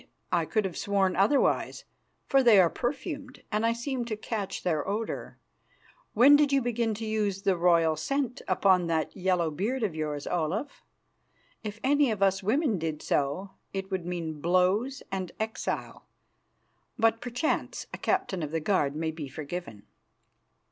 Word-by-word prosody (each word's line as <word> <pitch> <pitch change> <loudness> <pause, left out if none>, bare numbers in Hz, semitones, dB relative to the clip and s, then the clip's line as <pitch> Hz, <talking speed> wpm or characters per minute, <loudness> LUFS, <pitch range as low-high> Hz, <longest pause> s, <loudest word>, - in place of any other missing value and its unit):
I - - +2
could 215 -3 0
have 185 - -4
sworn 195 -2 +1
otherwise, 205 +10 +2 0.4
for 270 -1 +4
they 235 -6 +7
are 175 -3 +5
perfumed, 275 +1 -4
and 210 +1 0
I 230 0 +3
seemed 240 0 -3
to 215 -2 -3
catch 210 -2 -4
their 160 -4 0
odour. 215 +3 -3 0.8
When 265 +6 +8
did 290 -1 +4
you 275 - +4
begin 235 -3 -1
to 225 +2 -5
use 210 -3 -1
the 195 -2 +3
royal 170 -2 +3
scent 265 - -2
upon 185 -2 +3
that 160 -1 -1
yellow 180 -3 +1
beard 220 - -2
of 200 -6 0
yours, 150 -2 -3
Olaf? 180 - -2 0.8
If 215 0 -6
any 285 0 +4
of 210 -3 0
us 195 0 +2
women 225 - +1
did 155 -2 -3
so, 145 +8 -1 0.2
it 195 0 -4
would 185 -2 -2
mean 165 -4 -4
blows 185 - +2
and 190 -2 -3
exile; 220 0 -4 0.9
but 225 -1 +2
perchance 250 +5 -2
a - - -5
captain 370 - 0
of 150 - -3
the 165 +2 -1
guard 150 -4 +1
may 160 +1 -1
be 155 -2 -6
forgiven." 140 - -7
195 Hz, 160 wpm, -28 LUFS, 170-235 Hz, 0.9 s, When